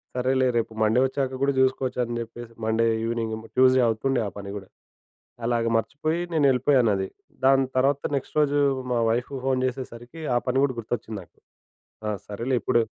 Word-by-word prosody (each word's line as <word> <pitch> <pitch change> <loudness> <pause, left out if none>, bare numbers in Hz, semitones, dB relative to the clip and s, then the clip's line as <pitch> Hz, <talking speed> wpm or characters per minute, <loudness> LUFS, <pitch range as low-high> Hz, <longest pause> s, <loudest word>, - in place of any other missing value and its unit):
సరేలే 130 +1 +2
రేపు 115 -1 -1
మండే 110 +3 +3
ఒచ్చాక 135 0 -2
కూడా 140 - +3
జూసుకోవచ్చు 130 -1 +1
అని 120 0 -4
జెప్పేసి 115 0 -8
మండే 110 +1 +2 0.2
ఈవెనింగ్, 115 -1 -2 0.2
ట్యూస్‌డే 130 0 +5
అవుతుండే 125 +4 0
ఆ - - -3
పని 100 -1 -6
కూడా 95 -1 -10 0.8
అలాగే 115 -1 +1
మర్చిపోయి 155 +8 -1
నేనేళ్ళిపోయానది. 125 -8 +3 0.4
దాని 135 0 +5
తర్వాత 135 +2 +2
నెక్స్ట్ 135 - -4
రోజు 145 -1 +2 0.4
మా 120 - +2
వైఫ్‌కి 125 +4 -1
ఫోన్ 130 -1 +1
చేసేసరికి 125 +3 -7
ఆ - - +5
పని 130 +1 +1
కూడా 130 -3 -3
గుర్తొచ్చింది 110 -1 -4
నాకు. - - -26 0.7
ఆ! - - 0 0.2
సరేలే 115 +5 -2
ఇప్పుడు 120 - +3
125 Hz, 155 wpm, -25 LUFS, 115-135 Hz, 0.8 s, ట్యూస్‌డే